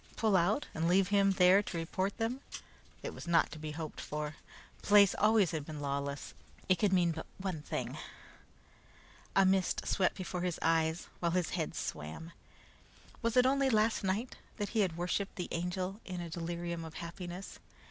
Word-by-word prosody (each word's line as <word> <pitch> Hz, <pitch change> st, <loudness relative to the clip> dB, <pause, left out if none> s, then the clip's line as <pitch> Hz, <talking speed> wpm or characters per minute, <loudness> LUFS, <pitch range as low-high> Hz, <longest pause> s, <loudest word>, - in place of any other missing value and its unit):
Pull 220 Hz, -3 st, +2 dB
out, 190 Hz, +10 st, +3 dB
and 160 Hz, +1 st, 0 dB
leave 185 Hz, +2 st, +4 dB
him 200 Hz, -1 st, +4 dB
there 185 Hz, +1 st, +6 dB
to 195 Hz, -, -5 dB
report 185 Hz, +4 st, -2 dB
them? 240 Hz, +3 st, -1 dB, 0.6 s
It -, -, -4 dB
was -, -, -9 dB
not 170 Hz, -1 st, +3 dB
to 155 Hz, -, -8 dB
be 155 Hz, 0 st, -5 dB
hoped 160 Hz, 0 st, -6 dB
for. 150 Hz, 0 st, -4 dB, 0.5 s
The -, -, -11 dB
place 205 Hz, -2 st, +7 dB
always 210 Hz, -3 st, +4 dB
had 160 Hz, -3 st, -2 dB
been 150 Hz, 0 st, -7 dB
lawless. 140 Hz, 0 st, -3 dB, 0.3 s
It 185 Hz, -2 st, +3 dB
could 205 Hz, 0 st, +3 dB
mean 175 Hz, -3 st, +4 dB
but 160 Hz, 0 st, -6 dB
one 185 Hz, -5 st, -3 dB
thing. -, -, -4 dB, 1.4 s
A 195 Hz, -, +6 dB
mist 190 Hz, -1 st, +2 dB
swept 185 Hz, -2 st, +1 dB
before 180 Hz, -1 st, -4 dB
his 180 Hz, -2 st, -1 dB
eyes, 160 Hz, +1 st, +1 dB
while 170 Hz, -1 st, 0 dB
his 180 Hz, -2 st, +1 dB
head -, -, -2 dB
swam. 80 Hz, -, -5 dB, 0.9 s
Was 230 Hz, +1 st, 0 dB
it 250 Hz, -, +7 dB
only 275 Hz, +1 st, +3 dB
last 220 Hz, -2 st, +2 dB
night 200 Hz, +6 st, -1 dB, 0.2 s
that 205 Hz, -2 st, -2 dB
he 225 Hz, -, -1 dB
had 180 Hz, -5 st, +1 dB
worshiped 180 Hz, +3 st, -1 dB
the 180 Hz, -, -4 dB
Angel 180 Hz, +4 st, -2 dB
in 180 Hz, -1 st, -5 dB
a 170 Hz, -1 st, -5 dB
delirium 170 Hz, 0 st, -3 dB
of 160 Hz, 0 st, -9 dB
happiness? 175 Hz, +2 st, -7 dB
180 Hz, 180 wpm, -33 LUFS, 165-200 Hz, 1.4 s, place